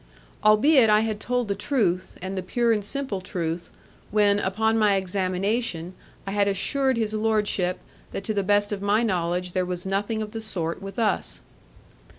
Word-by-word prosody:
Albeit 225 +4 +6
I 210 0 +5
had 220 -2 -2
told 245 0 -1
the 200 - 0
truth, 195 -5 -1
and 190 +1 -4
the 190 - -2
pure 235 +6 +1
and 210 -2 +1
simple 260 -3 -3
truth, 170 -2 -4 0.4
when, 205 -1 +3
upon 220 +4 +1
my 210 -2 +4
examination, 190 0 -1 0.3
I 195 - -4
had 200 0 +2
assured 260 +6 +1
his 220 -2 -1
lordship, 210 -4 0 0.3
that - - -5
to 215 - -2
the 200 - +1
best 205 +1 +2
of 200 -1 -3
my 205 +3 +2
knowledge 180 -3 -1
there 185 0 0
was 180 0 -4
nothing 205 +3 -1
of 210 - -8
the 225 0 -5
sort 175 -6 -3
with 195 +2 -8
us. 215 -4 -1
205 Hz, 175 wpm, -25 LUFS, 185-220 Hz, 0.4 s, Albeit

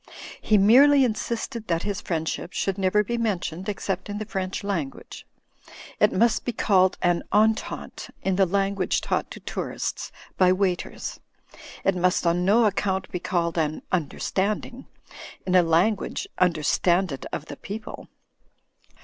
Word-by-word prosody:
He 215 - +3
merely 270 +8 +6
insisted 230 0 -3
that 170 0 0
his 205 -1 -3
friendship 165 +1 -3
should 195 0 -1
never 195 +2 +3
be 235 +3 -2
mentioned 190 -4 -2
except 195 -1 -3
in 205 - -4
the 215 - -4
French 190 -3 -4
language. 170 -9 -5 0.7
It - - +4
must 225 +3 +2
be 245 - -3
called 190 -4 +3
an 175 -1 +2
"entente" 220 +1 0
in 190 -1 +1
the 190 0 +3
language 195 0 0
taught - - -1
to - - -9
tourists - - -4 0.3
by 185 -1 +6
waiters. 185 -2 -2 0.6
It 195 - +2
must 180 0 +1
on 170 +1 +2
no 215 +5 +4
account 195 -2 -1
be 180 - -3
called 170 -1 -1
an 155 -1 -1
"tmderstanding," 200 - -2 0.6
in 185 - -1
a 185 - +7
language 175 +6 +1
understanded 175 -1 +1
of 145 - -4
the - - -9
people. 215 +2 -8
190 Hz, 140 wpm, -25 LUFS, 175-210 Hz, 0.7 s, a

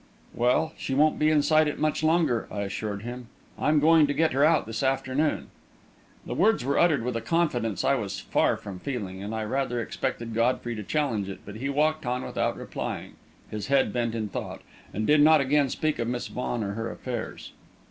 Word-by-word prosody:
"Well, 125 +7 +1
she 135 - -2
won't 150 +2 +3
be 155 - +4
inside 155 0 +4
it 150 - -2
much 155 0 0
longer," 155 -7 +2
I 100 - -4
assured 100 +1 -4
him. 120 0 -7 0.3
"I'm 150 0 +3
going 155 0 +5
to 145 - -1
get 160 0 +2
her 140 +2 +3
out 155 0 +4
this 115 0 -4
afternoon." 135 +2 0 0.7
The - - -4
words 210 - +2
were 140 +1 +1
uttered 155 -8 +3
with 125 -1 -2
a 115 - -1
confidence 120 - 0
I 135 - +4
was 105 -7 -2
far - - +1
from 95 -3 -8
feeling, 100 -8 -5
and 105 +3 -4
I 110 - -2
rather 125 +2 -1
expected 115 0 -3
Godfrey 120 +1 0
to 110 - -5
challenge 110 -5 -1
it, 95 - -8
but 105 +1 -8
he 135 +4 -3
walked 155 0 +1
on 125 +1 -1
without - - -1
replying, - - -5 0.4
his 105 -2 -4
head 135 -6 +2
bent 115 -2 -1
in 110 -2 -2
thought, - - -6 0.3
and 110 +2 -2
did 150 +3 +5
not 155 +1 +7
again 140 0 +2
speak 155 +2 -1
of 115 - -1
Miss 120 0 -3
Vaughan 120 -2 -3
or 100 - -3
her 115 +2 -3
affairs. 120 -3 -6
125 Hz, 205 wpm, -26 LUFS, 115-150 Hz, 0.7 s, not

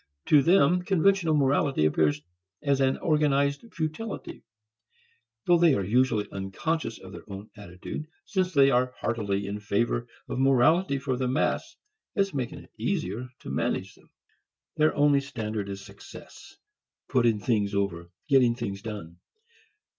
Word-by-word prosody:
To 150 -2 +7
them 175 +2 +4
conventional 185 -2 +2
morality 135 - +2
appears 75 -1 +1 0.4
as 140 -2 +2
an 135 0 +2
organized 145 +5 +1
futility; 165 +7 -5 1.0
though 175 -1 +4
they 165 -4 +5
are 100 - -1
usually 110 +1 +1
unconscious 115 - -3
of 95 - -12
their - - -9
own 100 +1 -9
attitude 100 - -8 0.2
since 185 -2 0
they 140 -4 +5
are 125 0 +1
heartily 100 -4 -1
in 100 +1 -4
favor 115 +3 -1 0.2
of - - -4
morality 135 +5 +3
for 130 -1 -2
the 130 0 -1
mass 130 +4 -1 0.4
as 195 -2 +1
making 130 -4 -4
it - - -21
easier 115 +8 -2
to - - -7
manage 70 - -2
them. - - -24 0.7
Their 155 0 +2
only 145 -1 +4
standard 110 -7 -4
is 100 0 -7
success, - - -13 0.5
putting 120 -4 +2
things 105 -2 0
over, 85 -4 -2 0.2
getting 130 -4 +4
things 100 -5 -5
done. 100 -7 -7
125 Hz, 140 wpm, -27 LUFS, 100-150 Hz, 1.0 s, To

